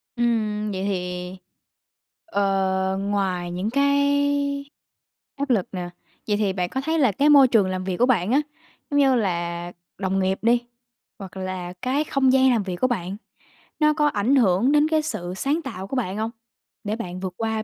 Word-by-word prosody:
Ừm, 215 Hz, -3 st, 0 dB
vậy 190 Hz, 0 st, -3 dB
thì, 180 Hz, -1 st, -4 dB, 0.9 s
ờ, 190 Hz, -5 st, 0 dB
ngoài 190 Hz, -3 st, -1 dB
những 185 Hz, +5 st, -2 dB
cái 280 Hz, +1 st, +1 dB, 0.6 s
áp 280 Hz, 0 st, -3 dB
lực 210 Hz, -7 st, +2 dB
nè, 180 Hz, -2 st, -5 dB, 0.4 s
vậy 205 Hz, -1 st, +1 dB
thì 205 Hz, -3 st, 0 dB
bạn 180 Hz, -2 st, -2 dB
có 265 Hz, -, -3 dB
thấy 320 Hz, +2 st, 0 dB
là 255 Hz, -7 st, +4 dB
cái 285 Hz, +10 st, +2 dB
môi 280 Hz, -3 st, +8 dB
trường 220 Hz, -6 st, +3 dB
làm 185 Hz, 0 st, -3 dB
việc 185 Hz, -2 st, -3 dB
của 245 Hz, -, +4 dB
bạn 225 Hz, -5 st, +1 dB
á, 280 Hz, -, +4 dB, 0.5 s
giống 285 Hz, -, +3 dB
như 270 Hz, -2 st, +4 dB
là 175 Hz, -5 st, -2 dB, 0.3 s
đồng 195 Hz, 0 st, -1 dB
nghiệp 190 Hz, 0 st, 0 dB
đi, 240 Hz, +1 st, +2 dB, 0.5 s
hoặc 190 Hz, -1 st, -9 dB
là 185 Hz, -1 st, -5 dB
cái 265 Hz, +4 st, 0 dB
không 270 Hz, -4 st, +2 dB
gian 265 Hz, 0 st, +5 dB
làm 230 Hz, -4 st, +1 dB
việc 185 Hz, -2 st, -4 dB
của 255 Hz, +8 st, +1 dB
bạn, 195 Hz, -5 st, -3 dB, 0.6 s
nó 305 Hz, -1 st, +4 dB
có 300 Hz, -1 st, +2 dB
ảnh 245 Hz, +1 st, +1 dB
hưởng 225 Hz, +2 st, +3 dB
đến 300 Hz, +1 st, +4 dB
cái 315 Hz, -1 st, +2 dB
sự 180 Hz, -, -4 dB
sáng 295 Hz, -, 0 dB
tạo 195 Hz, -, -7 dB
của 270 Hz, -, -5 dB
bạn 205 Hz, -6 st, -2 dB
hông, 220 Hz, +1 st, -2 dB, 0.5 s
để 210 Hz, +1 st, -2 dB
bạn 185 Hz, -5 st, -6 dB
vượt 185 Hz, -1 st, -4 dB
qua 220 Hz, -1 st, -2 dB
215 Hz, 185 wpm, -23 LUFS, 185-270 Hz, 0.9 s, môi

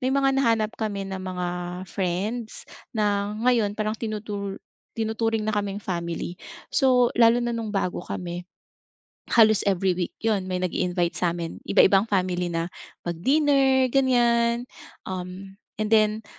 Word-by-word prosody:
may 255 Hz, -, 0 dB
mga 275 Hz, 0 st, +3 dB
nahanap 230 Hz, -5 st, +2 dB
kami 205 Hz, -3 st, -2 dB
na 190 Hz, -1 st, -5 dB
mga 180 Hz, -1 st, -3 dB, 0.4 s
friends 200 Hz, +5 st, -3 dB, 0.3 s
na 205 Hz, -1 st, 0 dB
ngayon 225 Hz, -5 st, +3 dB
parang 215 Hz, 0 st, -1 dB
tinutu 205 Hz, -3 st, -4 dB, 0.4 s
tinuturing 225 Hz, 0 st, 0 dB
na 215 Hz, -, 0 dB
kaming 205 Hz, 0 st, -2 dB
family 170 Hz, -1 st, -4 dB, 0.3 s
so, 250 Hz, -3 st, +4 dB
lalo 230 Hz, +1 st, +6 dB
na 240 Hz, -, -1 dB
nung 225 Hz, -2 st, -4 dB
bago 185 Hz, -2 st, -1 dB
kami. 175 Hz, 0 st, -5 dB, 0.9 s
Halos 220 Hz, -3 st, +6 dB
every 190 Hz, -1 st, +2 dB
week 175 Hz, -1 st, -3 dB
yun 200 Hz, -4 st, +1 dB
may 185 Hz, -, -1 dB
nag-iinvite 180 Hz, -1 st, 0 dB
sa'min 170 Hz, -1 st, -2 dB
iba-ibang 195 Hz, +3 st, +5 dB
family 180 Hz, -2 st, 0 dB
na 165 Hz, 0 st, -2 dB, 0.4 s
mag-dinner 265 Hz, -, +3 dB
ganyan 240 Hz, -3 st, +3 dB, 0.4 s
um, 185 Hz, +1 st, -6 dB, 0.2 s
and 215 Hz, -1 st, -1 dB
then 215 Hz, 0 st, +3 dB
210 Hz, 130 wpm, -25 LUFS, 185-230 Hz, 0.9 s, lalo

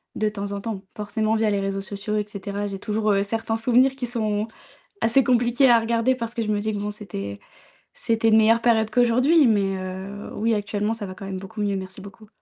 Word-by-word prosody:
de 215 Hz, 0 st, +1 dB
temps 205 Hz, -1 st, -5 dB
en 200 Hz, -, -4 dB
temps, 205 Hz, -3 st, -5 dB
forcément 215 Hz, +1 st, -1 dB
via 220 Hz, -1 st, +2 dB
les 200 Hz, -1 st, +1 dB
réseaux 195 Hz, 0 st, -2 dB
sociaux 205 Hz, +2 st, -4 dB
et 210 Hz, -, -1 dB
cetera. 205 Hz, 0 st, -4 dB
J'ai 195 Hz, -, -5 dB
toujours, 215 Hz, 0 st, 0 dB
heu, 200 Hz, 0 st, +2 dB
certains 225 Hz, +1 st, -2 dB
souvenirs 250 Hz, +4 st, +3 dB
qui 260 Hz, -, -4 dB
sont 215 Hz, -3 st, -1 dB, 0.5 s
assez 255 Hz, +4 st, +4 dB
compliqués 245 Hz, +2 st, +3 dB
à 235 Hz, -1 st, +7 dB
regarder 230 Hz, +3 st, +1 dB
parce 230 Hz, -2 st, -4 dB
que 235 Hz, -, -2 dB
je 220 Hz, -, -2 dB
me 205 Hz, -, +1 dB
dis 215 Hz, +1 st, -1 dB
que, 210 Hz, -, -3 dB
bon, 205 Hz, -, -3 dB
c'était 100 Hz, -, -7 dB, 0.6 s
c'était 225 Hz, 0 st, 0 dB
une 220 Hz, 0 st, +6 dB
meilleure 225 Hz, +1 st, +4 dB
période 225 Hz, -2 st, +2 dB
qu'aujourd'hui, 255 Hz, +6 st, +4 dB
mais 200 Hz, -3 st, +2 dB
heu, 190 Hz, +2 st, -6 dB
oui, 225 Hz, +1 st, +1 dB
actuellement, 210 Hz, +1 st, -1 dB
ça 225 Hz, -2 st, -6 dB
va 185 Hz, -, -8 dB
quand 195 Hz, -, -9 dB
même 190 Hz, -1 st, -4 dB
beaucoup 210 Hz, +3 st, -7 dB
mieux. 200 Hz, -1 st, 0 dB
Merci 190 Hz, 0 st, -8 dB
beaucoup. 200 Hz, +2 st, -13 dB
215 Hz, 225 wpm, -23 LUFS, 200-230 Hz, 0.6 s, à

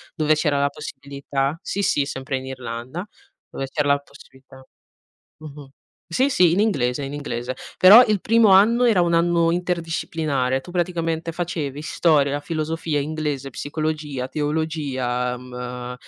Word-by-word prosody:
dove 155 Hz, -1 st, +2 dB
c'era 150 Hz, -2 st, +1 dB
la 140 Hz, -, +2 dB
possibilità. 140 Hz, +1 st, -4 dB
Sì, 200 Hz, -, -3 dB
sì, 145 Hz, -7 st, +1 dB
sempre 135 Hz, -1 st, -4 dB
in 130 Hz, -, -7 dB
Irlanda, 130 Hz, -, -6 dB, 0.4 s
dove 135 Hz, -, -5 dB
c'era 145 Hz, 0 st, -1 dB
la 140 Hz, -, +4 dB
possibilità 135 Hz, -2 st, -18 dB, 0.7 s
mh-mh, 145 Hz, -2 st, -11 dB, 0.4 s
sì 260 Hz, +11 st, +2 dB
sì, 180 Hz, -10 st, +4 dB
in 175 Hz, -, +1 dB
inglese, 140 Hz, -, +1 dB
in 135 Hz, -, -6 dB
inglese. 130 Hz, -3 st, -4 dB, 0.2 s
Però 215 Hz, +7 st, +9 dB
il 210 Hz, -3 st, 0 dB
primo 225 Hz, -1 st, +4 dB
anno, 215 Hz, +6 st, +5 dB
era 210 Hz, -7 st, +4 dB
un 170 Hz, -1 st, +1 dB
anno 170 Hz, 0 st, +3 dB
interdisciplinare. 160 Hz, -6 st, -1 dB
Tu 175 Hz, -, -12 dB
praticamente 165 Hz, -2 st, -1 dB
facevi 155 Hz, -4 st, -4 dB
storia, 150 Hz, -4 st, +2 dB
la 145 Hz, -, -2 dB
filosofia, 155 Hz, -1 st, -2 dB
inglese, 145 Hz, -2 st, -3 dB
psicologia, 150 Hz, -1 st, -3 dB
teologia, 140 Hz, -5 st, -2 dB
mhmm, 125 Hz, 0 st, -7 dB
150 Hz, 140 wpm, -22 LUFS, 135-170 Hz, 0.7 s, Però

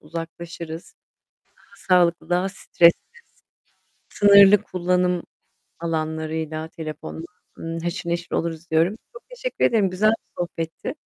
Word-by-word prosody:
uzaklaşırız. 165 Hz, +1 st, -8 dB, 0.6 s
Daha -, -, -23 dB
sağlıklı 175 Hz, -3 st, +2 dB
daha 180 Hz, +2 st, +1 dB
stressiz. 170 Hz, -3 st, +4 dB, 1.2 s
Sınırlı 200 Hz, 0 st, +7 dB
kullanım 180 Hz, 0 st, 0 dB, 0.6 s
alanlarıyla 160 Hz, -1 st, -3 dB
telefonla, 160 Hz, 0 st, -7 dB, 0.3 s
ımm, 165 Hz, 0 st, -5 dB
haşır 170 Hz, +1 st, -4 dB
neşir 170 Hz, 0 st, -3 dB
oluruz 165 Hz, 0 st, -3 dB
diyorum. 165 Hz, +5 st, +3 dB, 0.2 s
Çok 485 Hz, -, -11 dB
teşekkür -, -, -2 dB
ederim. 210 Hz, -5 st, +3 dB
Güzel 190 Hz, +4 st, +2 dB
bir 225 Hz, -, -3 dB
sohbetti. 165 Hz, -2 st, -5 dB
170 Hz, 110 wpm, -23 LUFS, 160-185 Hz, 1.2 s, Sınırlı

